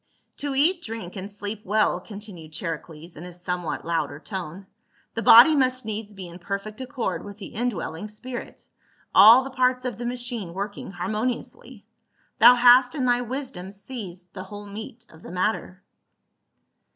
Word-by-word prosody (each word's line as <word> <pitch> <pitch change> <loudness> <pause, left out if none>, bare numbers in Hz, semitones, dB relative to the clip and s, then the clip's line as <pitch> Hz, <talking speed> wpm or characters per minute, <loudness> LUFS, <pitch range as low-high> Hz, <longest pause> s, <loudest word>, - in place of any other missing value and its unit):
" - - -48
To 285 -1 -3
eat, 335 +6 +3
drink, 220 - -7
and 195 +1 -6
sleep 205 +1 -6
well," 210 -2 +2
continued 190 -6 -10
Chari 165 -1 -3
cles 165 +1 -13
in 155 - -9
a 180 - -8
somewhat 180 -1 -4
louder 165 -3 -2
tone, 185 0 -7 0.2
" - - -38
the 230 - -3
body 240 +8 +9
must 255 -3 +1
needs 215 -1 -4
be 190 -2 -8
in 170 +1 -11
perfect 200 +5 -5
accord 260 -1 -3
with 205 0 -10
the 205 - -10
indwelling 210 -6 -3
spirit, 240 +4 -8 0.5
all 225 +6 +9
the 270 - -7
parts 255 0 +1
of 245 -4 -4
the 240 - -4
machine 240 -7 -4
working 200 +1 -5
harmoniously. 215 +7 -4 0.5
Thou 250 - +9
hast 250 +2 +6
in 265 -4 -1
thy 245 0 +3
wisdom 245 -7 -6
seized 195 -4 -9
the 185 -1 -7
whole 205 +1 -9
meat 220 +3 -9
of 160 - -17
the - - -10
matter." 185 0 -2
210 Hz, 170 wpm, -25 LUFS, 185-245 Hz, 0.5 s, body